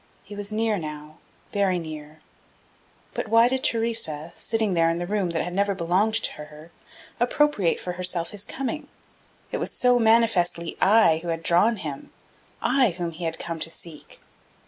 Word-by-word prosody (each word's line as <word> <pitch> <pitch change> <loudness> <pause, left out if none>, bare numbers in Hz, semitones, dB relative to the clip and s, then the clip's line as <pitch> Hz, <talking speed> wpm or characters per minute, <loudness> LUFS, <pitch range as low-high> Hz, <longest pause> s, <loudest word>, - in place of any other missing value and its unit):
He 205 - -10
was 205 0 -3
near 215 -1 0
now, 150 -1 -8 0.4
very 195 -3 +2
near, 155 -2 -8 0.9
but - - -3
why 230 +2 +5
did 260 +1 -1
Theresa, 175 -9 +1
sitting 220 -3 -1
there 165 -1 +3
in 165 - 0
the 175 - -3
room 200 -1 -1
that 165 -1 -1
had 175 - -5
never 200 +1 +1
belonged 185 +5 +1
to 225 - +2
her, 150 +2 -12 0.5
appropriate 240 - +2
for 180 - -4
herself 175 -1 -2
his 205 -1 -3
coming? 285 +5 -4 0.6
It - - -2
was - - -2
so 250 -1 +3
manifestly 220 -7 +2
I 190 -6 +5
who 175 - -8
had 165 -1 -2
drawn 190 +8 +4
him, 150 -7 -6 0.5
I 255 -10 +3
whom 170 -2 -3
he 165 +1 -6
had 165 0 -2
come 165 -1 -5
to 160 - -1
seek. 165 -1 -9
180 Hz, 170 wpm, -25 LUFS, 165-225 Hz, 0.9 s, why